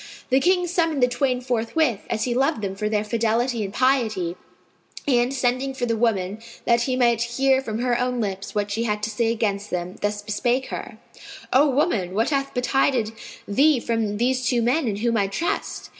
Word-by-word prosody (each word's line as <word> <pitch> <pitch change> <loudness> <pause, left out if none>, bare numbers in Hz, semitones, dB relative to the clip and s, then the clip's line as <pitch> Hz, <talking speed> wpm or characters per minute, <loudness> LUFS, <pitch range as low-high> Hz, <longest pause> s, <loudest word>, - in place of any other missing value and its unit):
The 260 - +5
King 360 +4 +2
summoned 330 -6 0
the - - +6
twain 250 0 0
forthwith, 245 0 0
as 220 - -1
he 245 - 0
loved 265 -2 +1
them 195 -1 -2
for 210 +2 -2
their 210 -1 0
fidelity 230 +2 0
and 195 - -4
piety; 220 -9 +1 0.7
and, 245 -2 +3
sending 260 +1 0
for 255 -2 -1
the 230 -1 0
woman, 210 -3 0 0.3
that 235 0 +3
he 255 +1 0
might 235 -2 +3
hear 265 +3 +2
from 220 -4 -4
her 240 0 0
own 250 0 -1
lips 195 -3 -4
what 205 -1 -1
she 220 +3 -1
had 210 -1 -2
to 220 - -1
say 225 +1 0
against 210 -3 -1
them, 180 +1 -4
thus 205 0 -2
bespake 240 +5 -1
her, - - -6 0.6
"O 285 +3 +5
woman, 230 - 0
what 225 +7 +1
hath 275 -1 0
betided 250 -2 +1 0.4
thee 275 +6 +4
from 225 -3 -1
these 255 +3 +1
two 240 -1 +1
men 260 +4 +1
in 210 - -1
whom 230 +2 0
I 200 -2 +2
trust?" 200 - -3
235 Hz, 195 wpm, -23 LUFS, 210-260 Hz, 0.7 s, the